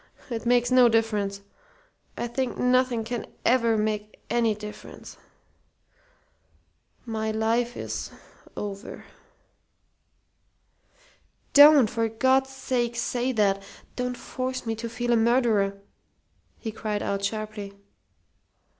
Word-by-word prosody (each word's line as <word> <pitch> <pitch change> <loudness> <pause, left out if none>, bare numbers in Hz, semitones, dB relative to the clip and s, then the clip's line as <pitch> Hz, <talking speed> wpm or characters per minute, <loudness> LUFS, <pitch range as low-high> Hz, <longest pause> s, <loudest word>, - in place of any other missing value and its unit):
It 230 0 -3
makes 245 0 +3
no 250 -1 +6
difference. 210 -3 0 0.8
I - - -2
think 245 +1 -3
nothing 250 -2 +2
can 235 +1 -4 0.2
ever 235 -2 +3
make 210 0 -2
any 230 -2 +2
difference. 210 0 -10 1.9
My 220 -2 -2
life 230 +2 0
is - - -4 0.5
over." 200 0 -6 2.5
"Don't, 290 -4 +8
for 225 +1 -1
God's 260 +4 +2
sake, 245 -3 -2
say 245 +1 -1
that! 200 -3 +2 0.3
Don't 250 0 -3
force 255 -1 -4
me 225 - -1
to 230 +1 -5
feel 240 +1 -1
a - - +5
murderer!" 225 -4 +2 0.8
he 220 - -5
cried 210 -1 -3
out, 200 0 -2
sharply. 210 -1 -4
230 Hz, 105 wpm, -26 LUFS, 215-245 Hz, 2.5 s, Don't